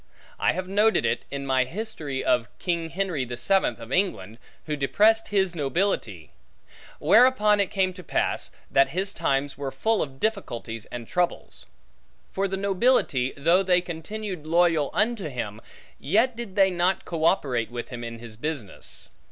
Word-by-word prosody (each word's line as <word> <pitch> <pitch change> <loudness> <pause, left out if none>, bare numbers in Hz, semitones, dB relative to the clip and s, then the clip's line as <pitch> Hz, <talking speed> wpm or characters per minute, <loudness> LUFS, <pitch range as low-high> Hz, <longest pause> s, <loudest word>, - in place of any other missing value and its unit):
I - - +2
have 185 +1 -4
noted 210 +3 +3
it, - - -1
in 140 0 -5
my 130 -1 +3
History 160 - -5
of 120 -1 +2
King 170 -2 -2
Henry 175 -5 -1
the 120 -1 -6
Seventh 160 - +2
of 115 +1 -10
England, 175 - -1 0.3
who 150 - -2
depressed 215 +11 +3
his 195 -4 +1
nobility; 135 - -1 0.7
whereupon 210 - +5
it 200 - +2
came 190 -3 +1
to 180 0 -11
pass, - - -1 0.2
that 135 0 +4
his 195 +1 0
times 135 0 -1
were 140 -1 -2
full 225 +7 +1
of 135 -2 -5
difficulties 120 - -3
and 120 -2 -7
troubles; 175 -1 -2 0.6
for 195 +1 0
the 195 0 -3
nobility, 195 - +2
though 165 +6 +4
they 180 -2 +4
continued 180 0 -6
loyal 165 -3 +3
unto 215 -3 0
him, 110 -5 -5 0.4
yet 225 - +2
did 230 -5 -7
they 195 -2 +5
not 180 +2 0
co 165 -2 -4
operate 125 -10 +1
with 120 -1 -6
him 120 -2 -7
in 115 0 -6
his 115 -2 -10
business. 140 -6 -5
170 Hz, 160 wpm, -25 LUFS, 135-195 Hz, 0.7 s, whereupon